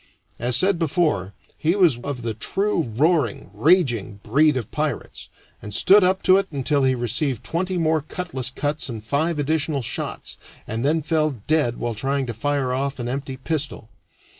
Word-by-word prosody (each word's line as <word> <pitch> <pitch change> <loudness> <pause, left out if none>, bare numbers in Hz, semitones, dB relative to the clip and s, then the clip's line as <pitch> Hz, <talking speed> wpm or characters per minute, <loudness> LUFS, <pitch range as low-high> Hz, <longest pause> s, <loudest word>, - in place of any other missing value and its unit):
As 120 +1 +1
said 185 +5 +3
before, 150 - 0 0.3
he 165 +4 +2
was 170 - +4
of 125 -1 -5
the 115 -1 -2
true 170 - -1
roaring, 150 - +1
raging 120 - +2
breed 145 +6 +3
of 120 -4 -5
pirates, 150 -1 -4 0.3
and 105 -1 -5
stood 200 +1 +6
up 185 +1 +2
to 185 - +6
it 195 0 0
until 140 0 0
he 130 0 +3
received 120 +1 -1
twenty 185 +2 -2
more 160 -2 +2
cutlass 150 -5 -4
cuts 145 +2 -2
and 110 -3 -6
five 150 +8 0
additional 150 -1 0
shots, - - -4 0.3
and 115 +2 -3
then 155 +3 +1
fell 155 -4 0
dead 150 -7 +1
while 120 -1 -2
trying 135 +5 -1
to 120 - -4
fire 135 +2 -1
off 135 +1 -2
an 120 -2 -4
empty 135 +1 -4
pistol. 140 -5 -3
140 Hz, 170 wpm, -23 LUFS, 120-160 Hz, 0.3 s, stood